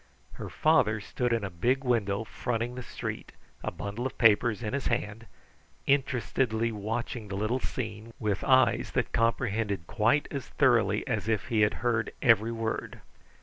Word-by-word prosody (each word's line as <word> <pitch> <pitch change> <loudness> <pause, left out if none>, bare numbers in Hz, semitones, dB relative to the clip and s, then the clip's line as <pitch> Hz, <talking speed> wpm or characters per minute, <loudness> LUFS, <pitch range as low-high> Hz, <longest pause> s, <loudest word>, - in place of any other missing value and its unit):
Her - - -7
father 130 -9 +3
stood 120 +3 -2
in 115 -2 +1
a 100 - -4
big 125 +10 0
window 110 -5 +1
fronting 120 +1 -3
the 125 - -6
street, - - -6 0.3
a - - -1
bundle 105 +5 -4
of - - -11
papers 115 0 +4
in 105 - -3
his 140 -1 -1
hand, 115 -1 -2 0.6
interestedly 125 -4 +1
watching 110 +1 -4
the 100 - -5
little 110 +6 0
scene, 110 -3 -5
with 105 -3 -1
eyes 130 -2 +3
that - - 0
comprehended 110 -5 0
quite 130 - +2
as 140 -3 -4
thoroughly - - +2
as - - -2
if 110 0 -1
he 110 -3 +2
had 105 0 +3
heard 115 -2 +1
every 115 -3 +4
word. 115 -1 -4
115 Hz, 160 wpm, -29 LUFS, 105-125 Hz, 0.6 s, papers